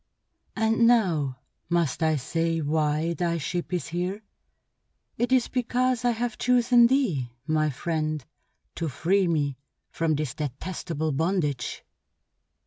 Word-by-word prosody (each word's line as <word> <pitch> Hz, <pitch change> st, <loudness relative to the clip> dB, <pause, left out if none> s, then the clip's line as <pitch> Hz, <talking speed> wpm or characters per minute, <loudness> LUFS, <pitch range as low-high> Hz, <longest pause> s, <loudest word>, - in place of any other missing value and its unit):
"And 225 Hz, +1 st, +3 dB
now 165 Hz, -, +2 dB, 0.3 s
must 170 Hz, -3 st, +1 dB
I 160 Hz, -1 st, +3 dB
say 165 Hz, +4 st, -1 dB
why 155 Hz, +1 st, 0 dB
thy 170 Hz, -1 st, -1 dB
ship 175 Hz, +3 st, -3 dB
is 175 Hz, -5 st, -2 dB
here? 180 Hz, +5 st, -3 dB, 1.0 s
It 245 Hz, +1 st, 0 dB
is 255 Hz, -2 st, +4 dB
because 250 Hz, 0 st, 0 dB
I 245 Hz, -, +3 dB
have 235 Hz, -1 st, -2 dB
chosen 245 Hz, -1 st, +5 dB
thee, 200 Hz, -, +1 dB, 0.2 s
my 155 Hz, -1 st, +1 dB
friend, 155 Hz, 0 st, -2 dB, 0.5 s
to 165 Hz, -2 st, -1 dB
free 185 Hz, +7 st, +1 dB
me 145 Hz, -5 st, 0 dB, 0.3 s
from 165 Hz, -2 st, 0 dB
this 145 Hz, -4 st, -2 dB
detestable 155 Hz, +2 st, -3 dB
bondage." 150 Hz, -4 st, -1 dB
170 Hz, 125 wpm, -26 LUFS, 155-220 Hz, 1.0 s, chosen